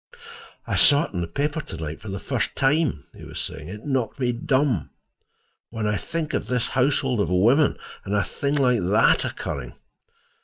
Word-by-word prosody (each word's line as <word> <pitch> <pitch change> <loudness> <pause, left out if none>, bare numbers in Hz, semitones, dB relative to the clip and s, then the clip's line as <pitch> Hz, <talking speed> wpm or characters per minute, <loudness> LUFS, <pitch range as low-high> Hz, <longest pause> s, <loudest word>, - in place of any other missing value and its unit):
"I - - -1
saw 145 +2 +7
it - - -8
in 90 - -2
the 85 - -3
paper 145 - -2
to - - -9
night 80 +4 -6
for 110 - -10
the 95 - -4
first - - -2
time," 135 - +1
he - - -12
was - - -7
saying. 75 - -5
"It 105 +4 -9
knocked 135 -4 -1
me 125 -2 +1
dumb. 125 - 0 0.8
When 115 -2 -4
I 105 0 +1
think 165 +3 -4
of - - -1
this 125 -2 0
houseful 130 -3 +1
of 85 - 0
women, 120 +12 +3 0.3
and 100 - -2
a 100 - +2
thing 140 +10 -2
like 125 -4 +3
that 100 +6 +3
occurring!" 60 -4 -5
120 Hz, 190 wpm, -24 LUFS, 95-140 Hz, 0.8 s, saw